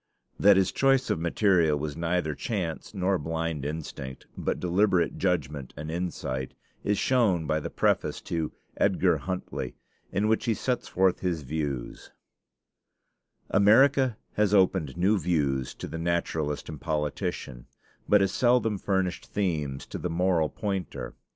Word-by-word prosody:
That 100 -1 +7
his 95 -1 +3
choice 135 -1 +2
of - - 0
material 85 -2 +3
was 75 0 -4
neither 85 -1 0
chance 95 - -4
nor 95 0 +1
blind 80 -1 -2
instinct, 70 -3 -6
but - - -2
deliberate 90 -1 +2
judgment 75 -8 -1
and 75 +2 -5
insight, 80 -7 -3 0.3
is 105 0 +1
shown 105 -11 +2
by 80 +1 +1
the - - -5
preface - - +1
to 80 -2 -2 0.3
'Edgar - - +3
Huntly,' 95 -1 -4 0.4
in 100 +3 +1
which 110 +2 +1
he 115 -3 +1
sets 125 +2 -2
forth 95 0 +2
his 85 -5 -2
views: 70 -3 -4 1.4
"America 125 +4 +5 0.2
has 105 -1 +2
opened 95 -7 +2
new 100 +4 +3
views 70 -6 0
to - - -7
the 80 - -6
naturalist 80 -3 -1
and 75 -2 -8
politician, 75 -5 -3 0.4
but 105 -1 +6
has 95 -1 +2
seldom 115 -2 +2
furnished 95 -2 -1
themes 75 -9 -2
to - - -7
the 90 - -2
moral 85 -2 +2
pointer. 95 -4 -4
85 Hz, 140 wpm, -27 LUFS, 75-100 Hz, 1.4 s, That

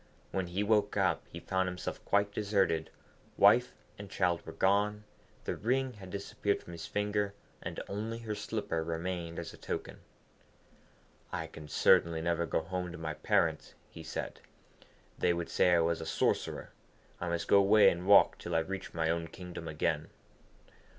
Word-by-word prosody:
When 95 -2 -1
he 95 +4 -1
woke 105 -1 +2
up, - - +2
he - - -7
found 95 0 0
himself 90 0 -5
quite 100 0 +2
deserted; 95 -6 +1 0.5
wife - - +6 0.3
and 100 -1 -8
child 90 -3 +1
were - - -5
gone, 105 +2 +2 0.4
the - - -2
ring 130 +3 0
had 100 -4 -11
disappeared 100 +1 -2
from - - -11
his 85 -1 -7
finger, 105 -1 -1 0.3
and - - -5
only 110 +3 -3
her 115 -2 -4
slipper 105 -5 -2
remained 85 0 -3
as - - -5
a - - -12
token. - - -5 1.3
'I 80 - -3
can 80 -1 -10
certainly 80 +2 +4
never 85 0 0
go - - 0
home 90 +1 -4
to 85 - -8
my 80 -1 -3
parents,' - - 0 0.2
he 80 - -9
said. 80 0 -5 0.8
'They 85 - +3
would 85 -1 -3
say 90 - +4
I 85 - +4
was 85 0 0
a 80 - -5
sorcerer. - - -1 0.5
I 85 - -3
must 85 0 -2
go 100 - +6
away 100 +1 +6
and 90 +2 -5
walk 100 0 +6
till 85 - -4
I - - +5
reach 95 +2 -6
my 80 -1 +1
own 85 0 -2
kingdom 85 -1 -8
again.' 80 0 -1
90 Hz, 170 wpm, -32 LUFS, 85-100 Hz, 1.3 s, wife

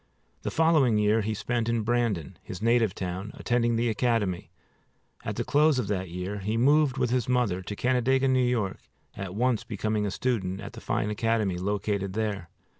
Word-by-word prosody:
The - - -2
following 155 -8 +3
year 105 +1 +3
he 110 +1 -2
spent 120 +1 -1
in 115 -1 0
Brandon, 110 -8 -1
his 90 - -8
native 115 -2 +2
town, 95 +2 -4
attending 120 -1 +1
the 115 +1 +1
academy. 110 -7 0 0.7
At - - -3
the - - -1
close 150 0 +3
of 125 - -1
that 95 -3 -2
year 90 +4 -4
he 105 +3 -2
moved 140 +2 +3
with 125 -3 0
his 125 -1 0
mother 120 -8 +1
to 105 +2 -6
Canandaigua, 130 +3 +2
N. 125 -2 +2
Y., 95 -1 -4 0.4
at 95 -1 -6
once 120 0 +1
becoming 105 0 -1
a - - -1
student 95 -4 -1
at - - -8
the - - -10
fine 105 - -1
academy 105 -4 0
located 100 0 -1
there. 100 -5 -2
110 Hz, 185 wpm, -27 LUFS, 100-125 Hz, 0.7 s, following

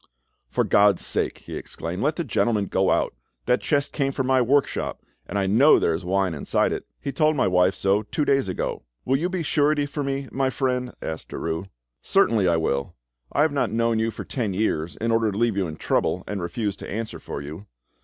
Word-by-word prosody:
"For - - +1
God's 100 0 +4
sake," - - -1
he - - -6
exclaimed, 85 +3 -5
"let 150 +2 +1
the 170 - -2
gentleman 115 -6 +1
go 95 0 +1
on. - - +2 0.4
That 125 - +2
chest 145 -2 0
came 135 -2 0
from 130 -1 -2
my 130 0 +3
workshop, 135 +4 0 0.2
and 100 - -3
I 100 - +1
know 120 +11 +6
there 85 - +2
is 80 +4 -3
wine 95 0 +1
inside 75 - 0
it; - - -5
he - - -4
told 155 +3 +2
my 130 - +2
wife 90 +1 +3
so 100 +2 +2
two 145 +8 -2
days 135 -8 +2
ago." 90 - -3 0.2
"Will 130 - +2
you 170 +5 -1
be 185 -2 -2
surety 145 -1 +2
for 145 0 -4
me, 135 0 -2
my 135 0 +1
friend?" 125 -1 -1
asked 80 0 -5
Derues. 80 +4 -4 0.3
"Certainly 115 - +3
I 85 -1 +3
will; 70 0 -1 0.4
I 145 - +3
have 155 - +2
not 140 - +1
known 115 +1 +1
you 110 +1 +1
for - - -6
ten 110 -8 -2
years 85 -5 -1
in 115 +1 -1
order 115 -1 +2
to 100 - -5
leave 115 -2 +2
you 95 -3 0
in 80 - -6
trouble - - 0
and 105 -2 -4
refuse 100 +3 -2
to - - -8
answer 110 +1 -4
for - - -6
you. 75 +8 -8
115 Hz, 220 wpm, -24 LUFS, 95-135 Hz, 0.4 s, know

